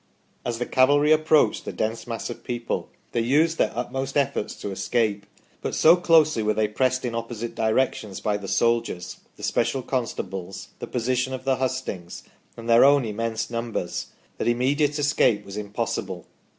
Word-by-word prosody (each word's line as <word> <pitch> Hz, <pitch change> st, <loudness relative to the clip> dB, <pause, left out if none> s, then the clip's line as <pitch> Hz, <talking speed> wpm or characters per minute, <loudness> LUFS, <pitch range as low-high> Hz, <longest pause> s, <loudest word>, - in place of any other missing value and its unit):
" -, -, -39 dB
As 120 Hz, -1 st, -1 dB
the 120 Hz, -, -2 dB
cavalry 145 Hz, +3 st, +4 dB
approached 155 Hz, -6 st, +4 dB
the -, -, -5 dB
dense 110 Hz, +2 st, -3 dB
mass 115 Hz, +1 st, -4 dB
of -, -, -9 dB
people 120 Hz, -1 st, -3 dB, 0.2 s
they -, -, 0 dB
used 155 Hz, +7 st, +2 dB
their -, -, +3 dB
utmost 135 Hz, +3 st, -3 dB
efforts 135 Hz, -6 st, 0 dB
to 100 Hz, -, -6 dB
escape, 105 Hz, 0 st, -1 dB, 0.3 s
but -, -, -3 dB
so 165 Hz, +2 st, +7 dB
closely 160 Hz, -7 st, +4 dB
were 105 Hz, 0 st, +1 dB
they 110 Hz, 0 st, +2 dB
pressed 130 Hz, +4 st, 0 dB
in 120 Hz, -, -2 dB
opposite 115 Hz, 0 st, -4 dB
directions 110 Hz, -3 st, 0 dB
by 105 Hz, -1 st, 0 dB
the 100 Hz, -1 st, -8 dB
soldiers, 115 Hz, -6 st, 0 dB, 0.2 s
the -, -, -13 dB
special 135 Hz, -2 st, 0 dB
constables, 95 Hz, -7 st, -4 dB
the -, -, -6 dB
position 125 Hz, +2 st, -1 dB
of 130 Hz, -, -9 dB
the 135 Hz, -1 st, +1 dB
hustings, 130 Hz, -9 st, -4 dB, 0.3 s
and 115 Hz, 0 st, -8 dB
their 115 Hz, 0 st, +6 dB
own 140 Hz, -1 st, +5 dB
immense 115 Hz, +1 st, -3 dB
numbers 115 Hz, -7 st, -3 dB, 0.3 s
that -, -, -1 dB
immediate 140 Hz, +5 st, +2 dB
escape 140 Hz, -7 st, +2 dB
was 100 Hz, -, -8 dB
impossible. 100 Hz, -3 st, -3 dB
120 Hz, 170 wpm, -25 LUFS, 110-130 Hz, 0.3 s, so